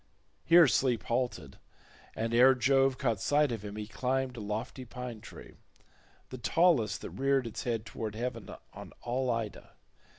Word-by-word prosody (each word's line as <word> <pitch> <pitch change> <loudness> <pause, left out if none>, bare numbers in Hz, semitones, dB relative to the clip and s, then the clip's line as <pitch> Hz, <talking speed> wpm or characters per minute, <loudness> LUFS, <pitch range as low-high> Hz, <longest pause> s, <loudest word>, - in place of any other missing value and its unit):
Here 170 0 +7
Sleep 120 0 +1
halted, 120 - -3 0.6
and 115 +1 -2
ere 130 +3 +6
Jove 135 +1 +3
caught 115 -7 -1
sight 145 -1 +2
of 110 -3 -4
him 105 0 -7
he 105 0 -5
climbed 130 +4 -2
a - - -7
lofty 110 +5 -5
pine 125 -2 -8
tree—the 130 - -15
tallest 130 - +2
that - - -7
reared 135 -1 +1
its 115 - -6
head 115 -2 -2
towards 110 0 -6
heaven 115 -3 -4 0.2
on - - -10
all 125 +2 -1
Ida. 115 -3 -4
120 Hz, 155 wpm, -30 LUFS, 110-130 Hz, 0.6 s, Here